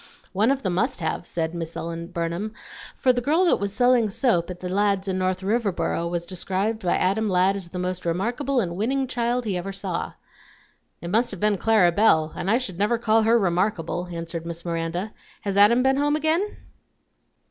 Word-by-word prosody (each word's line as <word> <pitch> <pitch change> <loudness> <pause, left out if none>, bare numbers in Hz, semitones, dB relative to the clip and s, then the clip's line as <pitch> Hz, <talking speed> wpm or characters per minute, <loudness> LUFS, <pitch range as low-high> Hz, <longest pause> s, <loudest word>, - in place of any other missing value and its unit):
"One 210 +5 +2
of 275 0 0
them 185 -3 0
must 175 - 0
have," 160 +1 -3
said 165 -1 -2
Miss 165 -1 -5
Ellen 165 0 -5
Burnham, 175 +4 -3 0.4
"for 255 - +3
the 245 - -1
girl 315 +8 +2
that 345 - +3
was 200 0 -2
selling 245 0 +3
soap 195 -6 +1
at 180 -1 -7
the 180 - -5
Ladds' 200 +1 +1
in 185 -1 -1
North 185 0 0
Riverboro 190 -6 0
was 170 0 -3
described 195 +5 -2
by 180 - +1
Adam 205 +4 +1
Ladd 185 +1 +3
as 195 -3 -5
the 180 - -8
most 180 0 -3
remarkable 240 - -1
and 175 -6 -2
winning 265 +7 0
child 245 -1 -1
he 195 -4 -1
ever 185 +2 -4
saw." 195 -3 -4 0.9
"It 170 - -5
must 230 +4 +2
have 195 - -6
been 210 -1 +1
Clara 215 -6 +4
Belle, 160 -5 +3
and 190 - -3
I 225 - +4
should 195 -9 -4
never 210 +4 +2
call 225 -1 +3
her 225 +2 +4
remarkable," 180 -2 0
answered 165 -1 -5
Miss 170 0 -6
Miranda. 170 +4 -3 0.3
"Has 200 -1 -3
Adam 215 +5 +6
been 265 0 +3
home 290 +1 +2
again?" 320 +7 0
195 Hz, 200 wpm, -24 LUFS, 175-230 Hz, 0.9 s, Adam